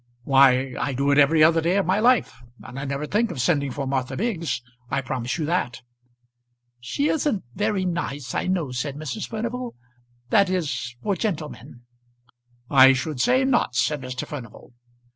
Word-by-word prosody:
"Why; 135 -1 +4
I 140 - -1
do 140 +2 +1
it 140 - +4
every 155 +2 +5
other 165 +1 +5
day 175 +4 +1
of 200 - +1
my 185 +4 +2
life. 240 - +2 0.2
And 125 +2 -8
I 140 - -4
never 140 +2 -3
think 215 +8 0
of 165 - -6
sending 140 0 +1
for 135 +2 -4
Martha 130 -1 -2
Biggs; 175 - -2 0.3
I 140 - 0
promise 125 +1 -3
you 160 - -2
that." 145 -8 -2 1.0
"She 205 - -1
isn't 285 -10 0
very 205 - 0
nice, 145 -7 -3
I - - -1
know," 175 -8 -1
said 135 +3 -3
Mrs. 155 +8 -5
Furnival 235 +2 -4 0.6
"that 200 -2 +4
is, 150 -9 -2
for 205 -2 0
gentlemen." 150 - -5 0.9
"I 135 -1 +7
should 130 0 -3
say 255 +2 +3
not," 240 - +1
said 145 +4 +1
Mr. 130 -1 -5
Furnival. 125 -4 -10
150 Hz, 170 wpm, -24 LUFS, 130-190 Hz, 1.0 s, I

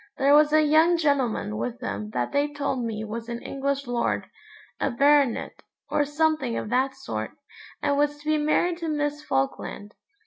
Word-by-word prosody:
There 275 +1 +4
was 300 0 +6
a 310 0 +5
young 320 +3 +4
gentleman 270 - 0
with 120 +1 -4
them 100 +2 -4
that 120 +2 -2
they 290 +1 +1
told 280 -3 -2
me 220 -2 -3
was 230 +2 -6
an 235 0 -4
English 275 0 -2
lord, 245 -1 -1 0.5
a - - +1
baronet, 280 -1 +2 0.3
or 290 - +2
something 295 -4 0
of 215 - -4
that 265 +2 +1
sort, 110 - -5 0.5
and 285 -1 +2
was 295 0 +1
to 295 - -18
be 310 0 +2
married 335 +3 +1
to 335 - -4
Miss 295 -1 -1
Falkland. 205 - -2
280 Hz, 175 wpm, -25 LUFS, 230-295 Hz, 0.5 s, was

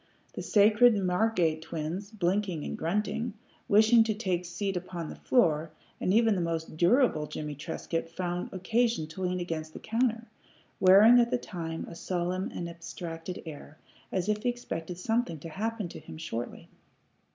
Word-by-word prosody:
The - - -5
sacred 215 +2 +5
Margate 180 -4 +1
twins, 165 +5 -4
blinking 190 -5 -1
and - - -3
grunting, 210 +6 -1 0.3
wished 220 +3 +6
to 220 - +1
take 185 -4 -1
seat 190 +3 -3
upon 175 -2 -5
the - - -7
floor, 160 -10 +2 0.3
and - - 0
even 225 +1 +4
the 185 - 0
most 165 -2 -3
durable 175 - +3
Jimmie 150 0 -5
Trescott 165 +2 -4
found 175 +1 -3
occasion 220 0 +1
to 160 +5 -9
lean 180 0 0
against 160 -3 -4
the - - -8
counter, 230 0 0 0.5
wearing 205 +6 +8
at 235 0 +3
the 250 - +1
time 165 -7 -5
a - - -9
solemn 180 +2 -2
and 170 - -4
abstracted 170 +1 -7
air, 155 -1 -9 0.3
as 185 -1 -1
if 210 0 0
he 245 - +1
expected 175 -8 -5
something 225 -2 0
to 165 +3 -8
happen 215 +3 -3
to - - -9
him - - -10
shortly. 120 -7 -5
180 Hz, 165 wpm, -29 LUFS, 165-215 Hz, 0.5 s, wearing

